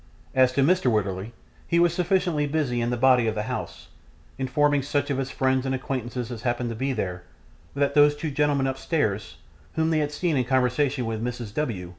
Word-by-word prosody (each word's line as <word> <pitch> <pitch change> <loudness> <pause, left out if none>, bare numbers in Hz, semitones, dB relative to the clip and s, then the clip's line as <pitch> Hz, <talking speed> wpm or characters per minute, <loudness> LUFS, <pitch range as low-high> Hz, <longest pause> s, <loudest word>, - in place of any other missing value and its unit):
As 130 -1 +4
to 135 - +2
Mr. 180 -2 +3
Wititterly, 100 0 -1 0.4
he 170 - +1
was 170 -1 +4
sufficiently 175 -4 +1
busy 140 -5 0
in 120 - 0
the 125 - -1
body 125 -1 +4
of 110 - -1
the 105 - -1
house, 85 -9 -6 0.5
informing 145 +2 +2
such 145 +1 -1
of 135 - -1
his 135 0 -2
friends 130 -1 +1
and 130 0 -1
acquaintance 130 -2 -4
as 115 -3 -6
happened 120 0 -1
to - - -5
be 135 +5 -1
there, 90 -7 -3 0.5
that 140 0 +1
those 145 0 +5
two 150 +1 -4
gentlemen 145 -1 +1
upstairs, 130 - -1 0.4
whom 160 0 +1
they 155 - +2
had 150 -1 -1
seen 155 0 0
in 125 - +1
conversation 130 +1 +1
with 110 0 -3
Mrs. 120 -3 -4
W. 105 - -3
130 Hz, 200 wpm, -25 LUFS, 120-145 Hz, 0.5 s, those